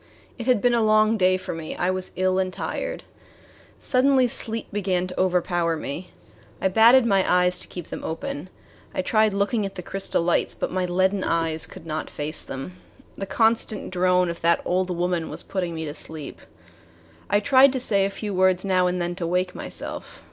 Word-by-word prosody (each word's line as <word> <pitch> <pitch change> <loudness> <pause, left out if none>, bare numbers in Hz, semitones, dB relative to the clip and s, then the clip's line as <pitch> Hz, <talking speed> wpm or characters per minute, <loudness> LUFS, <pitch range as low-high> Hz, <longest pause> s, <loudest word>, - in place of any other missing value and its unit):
It 235 - -5
had 250 -5 +3
been 245 -1 +4
a 235 - +2
long 215 0 +4
day 185 -2 +3
for 185 - -6
me. 165 -1 -6
I 180 +1 0
was 185 0 -1
ill 185 0 +1
and 185 -1 -1
tired. - - -4 0.7
Suddenly 265 0 +3
sleep 230 -1 +1
began 185 -3 0
to 185 - -6
overpower 175 -2 +1
me. 155 +5 -6 0.5
I 190 - +1
batted 230 +5 +6
my 195 -4 +3
eyes 180 0 +3
to - - -4
keep 175 -3 -8
them - - -7
open. 160 +1 -5 0.5
I 185 - -1
tried 215 +2 +3
looking 200 +3 0
at 195 - -5
the 180 - -6
crystal 195 -2 0
lights, 170 0 0
but - - -3
my 185 -1 -1
leaden 190 +2 +1
eyes 165 -1 0
could - - -12
not 155 -1 -4
face 150 +2 -2
them. 135 +8 -7 0.4
The 195 - -5
constant 220 0 +1
drone 180 -1 +2
of 170 - -9
that 170 0 +2
old 185 +1 0
woman 175 -1 -1
was - - -2
putting 180 -4 -3
me 160 0 -4
to 145 - -5
sleep. 155 -1 -8 0.9
I 205 - +3
tried 270 +3 +5
to 260 - -1
say 200 -5 +2
a 195 - +1
few 205 +1 -5
words 185 0 +2
now 185 -2 +2
and 180 0 -1
then 175 0 -2
to 170 -3 -2
wake 180 +1 0
myself. - - -6
185 Hz, 200 wpm, -24 LUFS, 175-205 Hz, 0.9 s, batted